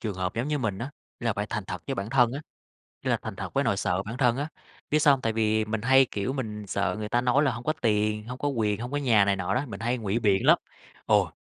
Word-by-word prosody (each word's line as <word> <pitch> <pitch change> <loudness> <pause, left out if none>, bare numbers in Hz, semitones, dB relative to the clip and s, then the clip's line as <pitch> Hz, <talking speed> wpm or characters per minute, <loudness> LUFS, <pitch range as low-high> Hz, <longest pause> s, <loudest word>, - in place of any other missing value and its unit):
trường 105 -4 -3
hợp 90 0 -3
giống 120 +5 -2
như 150 - 0
mình 100 -7 -2
á, 130 +4 -4 0.3
nghĩa 120 - -3
là 115 - +3
phải 105 +1 -3
thành 105 -1 -2
thật 90 -3 -5
với - - -2
bản 100 +3 -4
thân 125 -2 +4
á, 140 - -4 0.6
nghĩa - - -1
là - - +3
thành - - -6
thật - - -6
với - - +2
nỗi - - +1
sợ 90 +2 0
bản 115 +4 -6
thân 125 -1 +3
á. 145 - -2 0.4
Biết 150 - +3
sao 145 -1 +6
hông, 135 - -1
tại 115 -2 0
vì 110 0 +1
mình 110 0 -2
hay, 135 +3 +5
kiểu, 105 +6 -2
mình 105 -6 -5
sợ 100 +2 0
người 105 0 -4
ta 120 - +2
nói 125 +4 +3
là 135 - +2
hông 120 +1 -6
có 155 - +1
tiền, 105 0 +1
hông 125 +1 -6
có 145 - -2
quyền, 110 -6 0
hông 120 +2 -5
có 145 - 0
nhà 115 -8 +4
này 100 0 +2
nọ 95 - -2
đó, 125 - +1
mình 100 -4 -7
hay 120 +2 0
ngụy 110 -1 -1
biện 100 -4 +2
lắm, - - +7 0.5
ồ, - - +3
115 Hz, 300 wpm, -27 LUFS, 105-130 Hz, 0.6 s, lắm